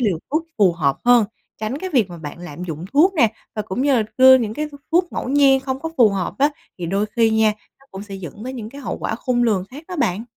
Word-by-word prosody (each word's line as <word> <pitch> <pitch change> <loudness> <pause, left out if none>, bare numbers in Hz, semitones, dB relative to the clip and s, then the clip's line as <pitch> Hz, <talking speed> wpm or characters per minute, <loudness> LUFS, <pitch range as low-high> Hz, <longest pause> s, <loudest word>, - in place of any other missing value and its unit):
liều 200 -9 +1
thuốc 310 +3 0
phù 190 -4 +5
hợp 140 -5 0
hơn, 245 -2 +6 0.4
tránh 220 +6 -3
cái 375 +3 -5
việc 230 - +2
mà 175 - -8
bạn 150 0 -8
lạm 175 -1 -8
dụng 160 -1 -6
thuốc 340 +7 +4
nè, 235 - +3 0.2
và 215 - -2
cũng 210 +4 -3
như 270 -5 +3 0.2
đưa 260 0 +9
những 220 -3 -3
cái 305 +4 -2
th 290 - -16 0.2
thuốc 350 +1 +2
ngẫu - - -4
nhiên 275 -1 +4
không 265 0 -4
có 325 - -3
phù 235 -3 +6
hợp 195 -3 -3
á, 285 +2 +4 0.3
thì 175 - -4
đôi 195 +4 0
khi 225 -1 +4
nha, 220 -1 +3 0.3
nó 275 - -23
cũng 195 +1 -8
sẽ 205 -1 -9
dẫn 195 +3 -8
tới 255 - -5
những 230 -5 -6
cái 280 +3 -10
hậu 250 - -4
quả - - -2
khôn 245 +1 0
lường 210 -6 +1
khác 290 +5 -10
đó 360 - -5
bạn. 210 -4 0
230 Hz, 270 wpm, -21 LUFS, 195-270 Hz, 0.4 s, đưa